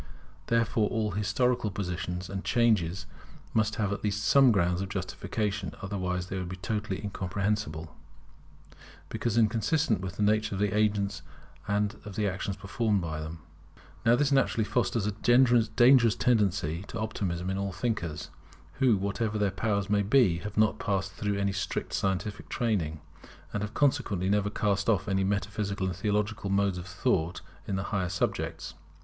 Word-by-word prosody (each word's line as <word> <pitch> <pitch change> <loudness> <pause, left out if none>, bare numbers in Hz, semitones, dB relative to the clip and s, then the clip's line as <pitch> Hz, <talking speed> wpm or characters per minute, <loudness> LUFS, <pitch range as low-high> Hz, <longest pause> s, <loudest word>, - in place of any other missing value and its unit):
Therefore 115 -2 +2
all 110 -3 -1
historical 110 +3 +1
positions 90 -2 -4
and 95 +1 -5
changes 95 -7 +2 0.5
must 110 -1 +1
have 100 -2 0
at - - -6
least 105 0 -1
some 135 +1 +6
grounds 90 -3 +1
of 95 - -4
justification; 100 +1 -3
otherwise 90 -3 -2
they 95 +1 -4
would 90 -1 -4
be 95 - -5
totally 105 0 -3
incomprehensible, 95 -4 -2 1.1
because 115 -1 -1
inconsistent 115 - +2
with 95 -2 -5
the 105 - -1
nature 105 0 +2
of - - -4
the 105 0 +1
agents 105 -2 +1 0.5
and 105 +1 0
of 105 -2 -8
the 105 0 +1
actions 95 +1 -3
performed 105 +1 0
by 80 -3 -4
them. 80 +1 -7 0.6
Now 115 +1 +5
this 145 +2 +1
naturally 135 -4 +3
fosters 120 -1 0
a 105 - 0
dangerous 120 +1 +5
tendency 95 -8 +1
to 115 - -6
Optimism 95 -4 -2
in 95 - -2
all 100 0 -2
thinkers, 90 -7 -3 0.5
who, 125 -6 +4
whatever 105 +3 -1
their 100 -2 +1
powers 100 +1 -1
may 105 -1 +2
be, 100 -5 +3
have 105 +3 -7
not 110 0 +3
passed 100 -3 -1
through 105 -1 -2
any 100 0 +1
strict 95 0 -3
scientific 95 +2 -2
training, 85 -10 -1 0.5
and 105 - -1
have 105 +1 -5
consequently 100 -9 +1
never 105 0 +2
cast 105 0 0
off 105 -5 +2
metaphysical 100 0 -1
and 95 -2 -2
theological 105 +2 -1
modes 100 -2 +1
of 90 - -8
thought 90 -3 0 0.3
in 100 - -1
the 95 - -1
higher 95 -3 0
subjects. 90 -2 -2
100 Hz, 160 wpm, -29 LUFS, 95-110 Hz, 1.1 s, some